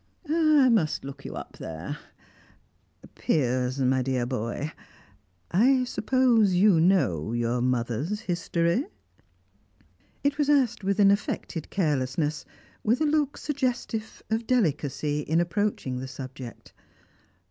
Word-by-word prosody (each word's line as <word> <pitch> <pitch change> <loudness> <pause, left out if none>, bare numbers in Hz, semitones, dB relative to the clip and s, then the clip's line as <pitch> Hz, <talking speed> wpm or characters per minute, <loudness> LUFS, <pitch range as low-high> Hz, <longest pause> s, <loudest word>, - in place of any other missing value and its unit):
"I 310 -3 +4
must 170 - +1
look 140 0 -9
you - - -6
up - - -8
there 85 - -6 1.1
Piers, 130 -3 0
my 130 -1 +2
dear 130 -1 0
boy, 125 +4 -3 0.8
I 255 +8 +4
suppose 240 -5 +2
you 185 -2 +5
know 115 - +2
your 120 +1 0
mother's 125 - -1
history?" 170 - 0 1.4
It 285 +1 0
was 295 -1 +2
asked 265 -8 +2
with 195 +1 0
an 200 -1 +7
affected 190 -5 -2
carelessness, 150 -3 -1 0.4
with 230 +4 +2
a 310 - +2
look 295 -2 +1
suggestive 250 -6 -3
of 225 +1 -1
delicacy 150 - 0
in 160 +3 0
approaching 175 -8 -1
the 130 - -5
subject. 130 -2 -9
170 Hz, 115 wpm, -26 LUFS, -, 1.4 s, an